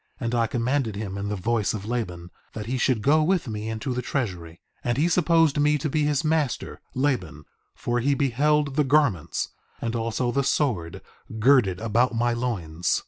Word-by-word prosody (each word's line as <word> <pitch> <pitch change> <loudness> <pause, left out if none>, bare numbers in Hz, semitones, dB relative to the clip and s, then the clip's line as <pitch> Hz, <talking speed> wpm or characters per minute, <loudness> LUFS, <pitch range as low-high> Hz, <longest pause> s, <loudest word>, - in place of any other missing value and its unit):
And 115 -1 -2
I 115 -1 +2
commanded 120 -1 -1
him 100 -2 -5
in 100 +1 -3
the 105 - -1
voice 110 +2 0
of 100 -1 -6
Laban, 90 -7 -4 0.2
that 105 - -5
he 125 +3 -2
should 120 -4 +1
go 155 +3 +4
with 175 -1 +1
me 110 0 -4
into 110 +4 -3
the 125 - -2
treasury. 95 - -3 0.2
4:21 - - -38
And 120 0 0
he 155 +4 +3
supposed 165 -3 +3
me 150 +1 +3
to 150 +2 -2
be 150 0 +1
his 150 0 +1
master, 155 -5 -1
Laban, 125 - -1 0.3
for 120 0 -1
he 140 +3 +2
beheld 145 +1 +1
the 150 - +4
garments 135 - +1 0.3
and 115 0 -3
also 115 +2 -1
the 140 +2 +1
sword 115 - -1 0.3
girded 110 -6 +4
about 115 +2 +1
my 120 +1 +1
loins. 90 -9 -1
120 Hz, 190 wpm, -25 LUFS, 105-140 Hz, 0.3 s, go